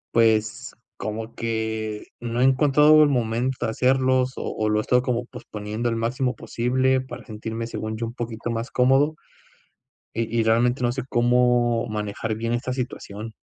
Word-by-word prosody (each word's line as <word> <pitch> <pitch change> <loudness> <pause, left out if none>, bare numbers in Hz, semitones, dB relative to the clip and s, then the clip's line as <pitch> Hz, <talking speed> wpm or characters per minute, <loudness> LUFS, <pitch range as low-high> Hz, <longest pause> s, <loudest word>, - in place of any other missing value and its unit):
pues, 110 -2 +2 0.2
como 110 +1 -5
que 110 -2 -3 0.2
no 120 0 -3
he 130 - +4
encontrado, 150 +3 +6
el 145 - +4
momento 120 +1 0
de - - 0
hacerlos, 130 +1 +2
o - - -4
o 110 0 +1
lo 105 0 +2
he - - +2
estado 125 +2 +2
como 125 -1 -1
posponiendo, 110 +1 -5
el 115 - -1
máximo 125 +2 -1
posible, 130 +2 +1
para 130 - -9
sentirme, 110 +1 -5
según 110 -1 -4
yo, 115 - -2
un 115 - -6
poquito 120 -1 -5
más 115 +2 -3
cómodo. 135 +5 +3 1.0
Y 115 0 -2
y 115 - +3
realmente 120 +3 +2
no 120 0 +1
sé 135 - -3
cómo 120 -1 +3
manejar 105 +1 -3
bien 115 +2 -2
esta 120 +2 -2
situación. 115 -4 -5
120 Hz, 170 wpm, -24 LUFS, 110-130 Hz, 1.0 s, encontrado